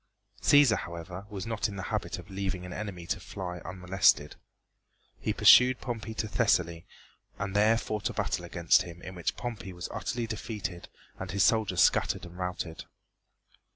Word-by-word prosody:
Cæsar, 145 -6 +6
however, 85 +3 -7
was 95 -3 -5
not 110 -1 -1
in 100 - -7
the 95 - -5
habit - - -2
of - - -11
leaving 95 -2 -3
an 90 - -7
enemy 100 -5 -6
to 95 - -2
fly 90 -1 -6
unmolested. 90 -5 +2 0.8
He - - -1
pursued 125 0 +7
Pompey 110 -3 -5
to 110 - -2
Thessaly 90 -7 +1 0.5
and 100 0 -4
there 110 +2 +5
fought 110 -2 -2
a - - -6
battle 100 -4 -1
against 85 0 +3
him 85 0 -9
in 95 - -7
which 90 -2 -3
Pompey 105 -6 -5
was 90 -1 -6
utterly 120 -1 -3
defeated 105 -5 -5 0.3
and - - -5
his 100 -1 +2
soldiers 110 0 +3
scattered - - +3
and 85 0 -11
routed. 90 -2 -4
95 Hz, 165 wpm, -29 LUFS, 90-110 Hz, 0.8 s, pursued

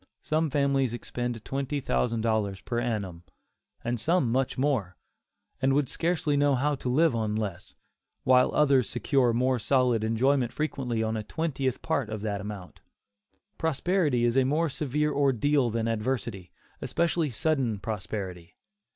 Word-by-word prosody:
Some 155 +1 +1
families 135 -3 +1
expend 120 -2 -4
twenty 140 +1 -2
thousand 110 - 0
dollars 110 -4 0
per 120 +3 -2
annum, 105 -8 -3 0.6
and 120 0 -2
some 165 -3 +1
much 130 +1 0
more, 125 - 0 0.6
and 135 +1 +3
would 140 -1 +2
scarcely 165 -2 0
know 145 -1 +3
how 145 +4 +1
to 130 -2 -3
live 155 +1 +3
on 110 -2 -1
less, 100 -5 -4 0.5
while 125 0 +5
others 135 -7 +4
secure 125 0 +2
more 125 +2 +1
solid 125 -1 +2
enjoyment 120 +3 +2
frequently 125 -7 -2
on 110 0 -1
a 110 - -2
twentieth 135 0 -2
part 140 -8 -1
of 110 -1 -4
that 105 -2 -2
amount. 100 -3 -8 0.8
Prosperity 160 -4 +1
is 120 0 +1
a 135 - +5
more 155 +5 +1
severe 150 +2 -1
ordeal 140 -1 +2
than 115 0 -1
adversity, 115 -4 -2 0.3
especially 170 -2 0
sudden 130 -3 0
prosperity. 95 -4 -5
125 Hz, 145 wpm, -27 LUFS, 110-145 Hz, 0.8 s, while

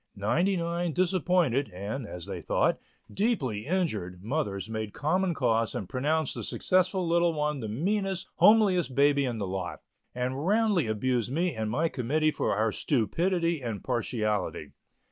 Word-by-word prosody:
Ninety 170 - +1
nine 170 0 -1
disappointed, 175 -6 +1
and 100 +7 -5
as 90 -1 -7
they - - -6
thought, - - +1 0.3
deeply 140 - -1
injured, 110 - -2
mothers 110 -6 -2
made 110 -2 -4
common 175 +4 0
cause 115 -4 +1
and 100 - -4
pronounced 150 - 0
the - - -5
successful 185 0 +1
little 170 0 +3
one 150 -1 -1
the 110 - -4
meanest, 190 - -1
homeliest 190 - +4
baby 140 0 +4
in 120 -3 -2
the 105 - -2
lot, 95 -1 -4 0.3
and 130 +3 -2
roundly 210 - +2
abused 120 +2 0
me 170 +3 0
and 110 -2 -3
my 155 +9 +1
committee 155 +3 0
for - - -1
our 110 +2 +1
stupidity 165 - 0
and 115 -5 -4
partiality. 110 -4 -2
145 Hz, 150 wpm, -28 LUFS, 110-175 Hz, 0.3 s, homeliest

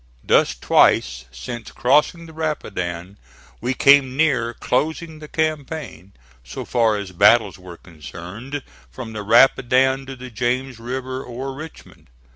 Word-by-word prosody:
Thus, 65 - +3
twice - - +2
since 105 - -8
crossing 150 +6 +2
the 160 - -13
Rapidan 100 - -4 0.4
we 125 +3 -1
came 140 -2 +5
near 125 -7 +1
closing 160 +4 -2
the 155 - -10
campaign, 150 - -4 0.3
so 60 - -7
far 115 -3 +2
as 100 -2 -6
battles 105 +2 +4
were 90 -2 -11
concerned, 90 - -9 0.3
from 110 - -8
the 105 - -5
Rapidan 130 +4 +3
to 135 - -7
the 125 0 -10
James 125 +2 -2
River 130 +2 -5
or 130 +2 -6
Richmond. 155 +3 -12
125 Hz, 130 wpm, -21 LUFS, 100-135 Hz, 0.4 s, came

